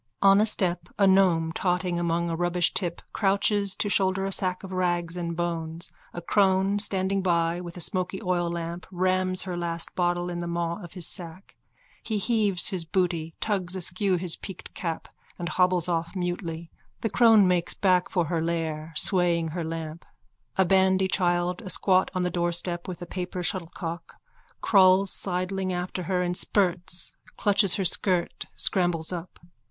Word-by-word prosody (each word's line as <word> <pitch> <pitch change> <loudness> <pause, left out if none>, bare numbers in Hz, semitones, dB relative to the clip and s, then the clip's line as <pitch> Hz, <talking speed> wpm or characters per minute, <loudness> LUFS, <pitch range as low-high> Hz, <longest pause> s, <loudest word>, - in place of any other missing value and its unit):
On 195 +1 +6
a 215 - +2
step 175 -4 -1
a 200 - +4
gnome 185 -4 +3
totting 180 0 -1
among 170 0 -1
a 165 - -2
rubbishtip 175 0 -1
crouches 200 0 +2
to - - -2
shoulder 190 -1 +1
a 195 - -3
sack 185 -1 0
of 190 - -8
rags 175 -2 -1
and 170 -2 -4
bones. 170 0 -1 0.2
A 175 - -8
crone 195 +1 +2
standing 195 -1 0
by 170 -1 0
with 175 0 -9
a - - -3
smoky 185 +1 -1
oillamp 175 -2 -3
rams 185 0 +1
her 185 -2 -5
last 170 -1 -1
bottle 175 0 -1
in 175 - -4
the 175 - -4
maw 170 0 -3
of 175 - -11
his 180 -3 -2
sack. 175 0 -8 0.5
He 220 - -3
heaves 205 -4 +1
his 185 -4 -2
booty, 165 -1 -2
tugs 190 -4 -2
askew 185 +2 +1
his 175 -1 0
peaked 190 -3 -10
cap 165 -3 -5 0.3
and 175 0 -4
hobbles 180 -1 +2
off 170 +1 -2
mutely. 170 -2 -4 0.3
The 225 - -1
crone 220 -2 +5
makes 180 -1 +1
back 180 -2 +2
for 175 -3 0
her 165 +1 -2
lair, 160 -1 -3
swaying 170 -2 +3
her 170 +2 -4
lamp. 160 0 -6 0.5
A 190 - +4
bandy 190 0 +3
child, 175 0 0
asquat 185 -1 +3
on 185 - 0
the 180 - -1
doorstep 175 0 +1
with 180 -1 -6
a - - -6
paper 180 0 -5
shuttlecock, 170 -1 -4 0.5
crawls 190 -1 +4
sidling 185 0 -2
after 180 +1 -4
her 180 0 -1
in 175 0 -1
spurts, 180 -2 +2 0.2
clutches 200 -2 +4
her 195 - -2
skirt, 180 -1 +1
scrambles 175 -3 +1
up. 175 0 -8
180 Hz, 165 wpm, -26 LUFS, 170-190 Hz, 0.5 s, On